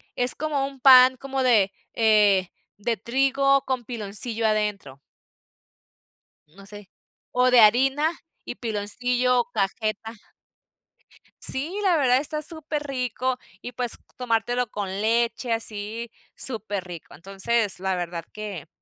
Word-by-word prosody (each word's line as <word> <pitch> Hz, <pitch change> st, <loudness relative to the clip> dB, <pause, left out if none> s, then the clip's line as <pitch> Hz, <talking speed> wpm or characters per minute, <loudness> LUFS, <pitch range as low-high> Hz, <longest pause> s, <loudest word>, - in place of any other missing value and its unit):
Es 245 Hz, 0 st, +3 dB
como 295 Hz, -3 st, -1 dB
un 275 Hz, -1 st, -12 dB
pan 255 Hz, -1 st, +7 dB
como 270 Hz, 0 st, -3 dB
de, 205 Hz, -6 st, +3 dB, 0.2 s
eh, 210 Hz, -4 st, +3 dB, 0.3 s
de 230 Hz, +3 st, -1 dB
trigo 275 Hz, +4 st, +2 dB
con 255 Hz, -2 st, -2 dB
piloncillo 225 Hz, 0 st, -2 dB
adentro. 210 Hz, -11 st, -2 dB, 1.5 s
No 195 Hz, +5 st, -16 dB
sé. 205 Hz, -2 st, -12 dB, 0.4 s
O 250 Hz, 0 st, +3 dB
de 245 Hz, -2 st, +7 dB
harina 270 Hz, +8 st, +4 dB, 0.3 s
y -, -, -6 dB
piloncillo 245 Hz, +3 st, 0 dB
o 240 Hz, +1 st, -4 dB
cajeta. 215 Hz, +2 st, -2 dB, 1.3 s
Sí, 310 Hz, +9 st, -2 dB
la 360 Hz, -4 st, +3 dB
verdad 255 Hz, -3 st, +3 dB
está 305 Hz, +2 st, -3 dB
superrico, 275 Hz, -6 st, -3 dB, 0.2 s
y 245 Hz, -, -7 dB
pues, 245 Hz, -1 st, -2 dB, 0.2 s
tomártelo 245 Hz, 0 st, 0 dB
con 205 Hz, -2 st, -4 dB
leche, 230 Hz, +4 st, 0 dB
así, 225 Hz, +1 st, -4 dB, 0.3 s
superrico. 200 Hz, -8 st, -3 dB
Entonces, 195 Hz, +3 st, -2 dB
la 190 Hz, 0 st, -1 dB
verdad 170 Hz, -1 st, -5 dB
que 205 Hz, -7 st, -7 dB
235 Hz, 120 wpm, -24 LUFS, 205-255 Hz, 1.5 s, pan